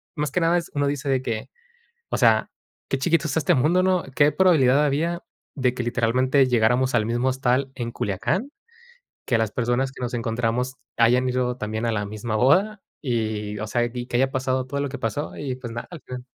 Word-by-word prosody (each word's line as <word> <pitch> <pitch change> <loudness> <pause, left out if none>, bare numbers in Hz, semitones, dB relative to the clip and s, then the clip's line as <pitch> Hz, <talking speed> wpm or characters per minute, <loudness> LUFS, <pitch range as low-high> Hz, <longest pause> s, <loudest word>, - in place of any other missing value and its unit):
más 150 -1 -1
que 180 - 0
nada 170 +1 +3
es, 170 - -8
uno 145 0 +1
dice 140 -1 -2
de 130 -1 +1
que, 115 -3 -3 0.6
o - - 0
sea, - - +4 0.4
qué 135 - 0
chiquito 165 +2 +1
es 135 - -3
este 160 - +3
mundo, 165 +8 +3
¿no? 185 -2 +2
¿Qué 145 +1 +5
probabilidad 150 -7 +4
había 165 +5 -1 0.3
de 130 -3 +1
que 125 - -3
literalmente 130 +3 +2
llegáramos 125 +2 +2
al 110 - +3
mismo 120 +3 0
hostal 130 +1 0
en 120 -2 -4
Culiacán? 175 - -2 0.8
Que 120 - +2
las 110 -2 0
personas 125 +2 0
que 130 - -10
nos 125 0 -3
encontramos 120 +2 -1 0.2
hayan 125 +2 +4
ido 125 -1 0
también 110 +1 -3
a 115 - +1
la 105 -1 -1
misma 110 +2 -4
boda 190 - +3 0.2
y, 110 -5 -2
o 110 - -3
sea, 120 +2 +1
y 120 -1 -5
que 120 - -2
haya 135 +2 +2
pasado 130 -1 -1
todo 140 +2 -3
lo 145 - -1
que 135 0 -6
pasó 130 +5 -3
y, 135 -3 -3
pues, 120 -3 -7
nada, 120 - -5
al 170 - -9
final. 125 0 -8
130 Hz, 210 wpm, -24 LUFS, 120-145 Hz, 0.8 s, Qué